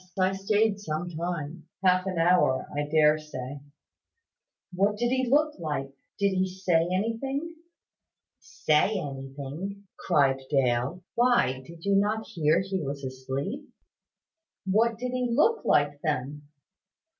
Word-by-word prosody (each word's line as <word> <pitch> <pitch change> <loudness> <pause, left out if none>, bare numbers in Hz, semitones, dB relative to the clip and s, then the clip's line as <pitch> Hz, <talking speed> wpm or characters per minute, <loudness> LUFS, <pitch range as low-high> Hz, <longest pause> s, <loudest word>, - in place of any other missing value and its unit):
I 185 0 +3
stayed 205 +2 +1
some 175 -2 -4
time; 165 -1 -5 0.2
half 185 +1 +4
an 185 -2 -2
hour, 165 -6 +3
I 145 0 -1
dare 155 0 +4
say." 145 -2 -7 1.1
"What 200 +3 +1
did 240 +2 +1
he 260 -1 +1
look 300 0 +2
like? 135 -4 -3 0.2
Did 200 0 +2
he 185 0 +1
say 180 -3 +1
anything?" 265 - -2 0.9
"Say 155 +8 +1
anything!" 140 +8 -6 0.2
cried 135 -2 +2
Dale: 135 +4 +1
"why, 235 - +2
did 170 +1 -12
you 200 - +2
not 215 +2 +1
hear 165 -3 +2
he 190 -1 -3
was 140 -1 -5
asleep?" 135 - -5 1.0
"What 220 +4 +2
did 250 +2 -3
he 250 -1 -1
look 305 - +3
like, 145 0 +2
then?" 145 -1 -3
175 Hz, 130 wpm, -27 LUFS, 145-210 Hz, 1.1 s, half